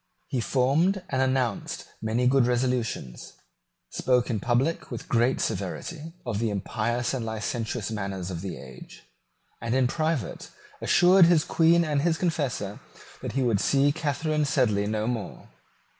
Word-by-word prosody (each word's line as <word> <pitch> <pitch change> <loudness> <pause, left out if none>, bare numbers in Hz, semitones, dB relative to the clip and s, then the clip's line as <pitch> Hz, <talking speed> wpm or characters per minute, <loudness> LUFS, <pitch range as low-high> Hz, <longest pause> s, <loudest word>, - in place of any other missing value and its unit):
He 125 - -1
formed 155 - +2
and 130 -1 0
announced 130 -4 -1 0.2
many 110 +3 0
good 130 -1 +4
resolutions, 120 - -2 0.6
spoke 125 -1 +1
in 110 - -1
public 125 +9 0
with - - -7
great 120 +2 +2
severity 150 - -4
of 115 -4 -2
the 115 -1 0
impious 120 +5 -1
and 130 -3 -2
licentious 110 0 -3
manners 100 -4 -4
of 85 -2 -5
the 95 -6 -5
age, 65 -1 -12 0.6
and 115 +2 -1
in 130 -1 +3
private 155 - -2 0.3
assured 180 +1 +6
his 170 -3 +4
Queen 170 +1 +4
and 150 -2 +1
his 165 +1 +1
confessor 145 - -2 0.4
that - - -5
he 135 - +1
would 115 -5 +2
see 140 +5 +3
Catharine 155 0 -1
Sedley 105 -8 +1
no 110 0 -1
more. 115 -3 -4
125 Hz, 145 wpm, -26 LUFS, 110-145 Hz, 0.6 s, assured